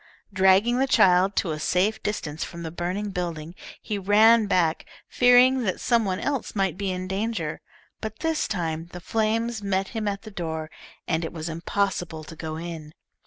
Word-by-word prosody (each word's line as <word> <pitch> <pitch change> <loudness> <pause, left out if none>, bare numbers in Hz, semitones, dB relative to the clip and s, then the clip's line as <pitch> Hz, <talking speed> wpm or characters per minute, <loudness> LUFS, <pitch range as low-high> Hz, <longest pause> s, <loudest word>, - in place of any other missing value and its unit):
Dragging 190 +6 +4
the 270 - +2
child 185 -4 +4
to 170 - 0
a 155 - -4
safe 185 +7 +1
distance 160 -7 -3
from 170 0 -7
the 160 - -5
burning 185 +5 -3
building, 170 -3 -4 0.3
he 210 -2 -4
ran 215 +3 +5
back, 170 -5 +1 0.2
fearing 250 +1 +5
that 190 -6 -1
some 235 -3 +2
one 185 -1 -1
else 275 -6 -2
might 195 -5 +1
be 200 0 -3
in 185 0 -3
danger, 195 -5 -3 0.4
but 220 0 -6
this 320 -1 0
time 165 -5 -3
the 180 - -6
flames 225 +3 -1
met 195 -1 -1
him 220 -3 -3
at 200 -1 -3
the 215 - -10
door, 160 -4 -4 0.4
and 160 0 0
it 165 - -4
was 165 0 -5
impossible 170 -1 -2
to 160 - -10
go 155 0 -5
in. 160 -2 -7
190 Hz, 180 wpm, -25 LUFS, 165-215 Hz, 0.4 s, ran